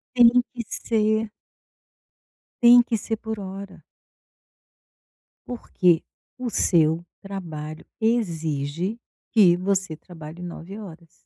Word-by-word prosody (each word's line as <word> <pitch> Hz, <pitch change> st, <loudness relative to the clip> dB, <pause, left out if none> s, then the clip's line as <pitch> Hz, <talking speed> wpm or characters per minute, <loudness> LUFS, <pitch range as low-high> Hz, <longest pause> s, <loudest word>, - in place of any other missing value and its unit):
Tem 240 Hz, -1 st, +8 dB, 0.2 s
que 240 Hz, -1 st, -4 dB
ser. 220 Hz, -1 st, 0 dB, 1.3 s
Tem 240 Hz, +1 st, +9 dB
que 235 Hz, -1 st, -1 dB
ser 225 Hz, +1 st, -3 dB
por 220 Hz, -1 st, -5 dB
hora. 195 Hz, 0 st, -8 dB, 1.6 s
Porque 180 Hz, -8 st, +1 dB, 0.3 s
o 250 Hz, -1 st, -3 dB
seu 165 Hz, -4 st, +2 dB, 0.2 s
trabalho 160 Hz, -6 st, -7 dB, 0.2 s
exige 170 Hz, -3 st, -1 dB, 0.3 s
que 195 Hz, -6 st, +6 dB
você 185 Hz, -2 st, -1 dB
trabalhe 165 Hz, 0 st, -11 dB
9 175 Hz, +2 st, -8 dB
horas. 170 Hz, -5 st, -13 dB
190 Hz, 95 wpm, -24 LUFS, 165-220 Hz, 1.6 s, Tem